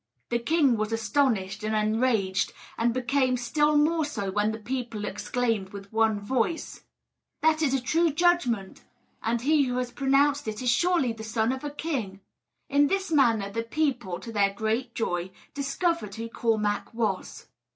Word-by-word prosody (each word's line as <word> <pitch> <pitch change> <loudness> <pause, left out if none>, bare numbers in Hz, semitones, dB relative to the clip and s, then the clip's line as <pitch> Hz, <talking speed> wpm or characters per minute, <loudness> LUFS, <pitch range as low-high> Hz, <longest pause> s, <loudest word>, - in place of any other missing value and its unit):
The 235 - +1
king 275 -1 +3
was 215 +1 -2
astonished 220 -3 0
and 215 0 -1
enraged, 215 -3 +1 0.2
and 235 +1 +1
became 255 +1 +1
still 295 +5 +2
more 315 +2 +3
so 210 -10 -3
when 210 +2 +1
the 220 - -5
people 235 -2 -4
exclaimed 220 -1 -1
with 200 +1 -10
one 220 -1 +2
voice: 255 +9 -2 0.6
"That 315 0 +3
is 275 -4 +2
a - - +1
true 330 +7 +2
judgment, 280 - +1 0.4
and 230 +1 0
he 295 +2 +3
who 250 -1 -2
has 250 -1 -2
pronounced 275 +1 +2
it 215 0 -3
is 250 -1 +2
surely 335 -4 +2
the 220 -1 -9
son 220 +1 0
of 265 +1 -4
a 295 - -2
king!" 270 -10 -4 0.5
In 285 +1 +4
this 390 +1 -1
manner 230 -9 +3
the 230 +3 -2
people, 240 - -1
to 230 - -7
their 200 -2 +2
great 225 +4 -2
joy, 175 -5 -1 0.2
discovered 280 - -1
who 230 +1 -5
Cormac 215 -2 -1
was. 215 -5 -2
235 Hz, 165 wpm, -27 LUFS, 215-280 Hz, 0.6 s, In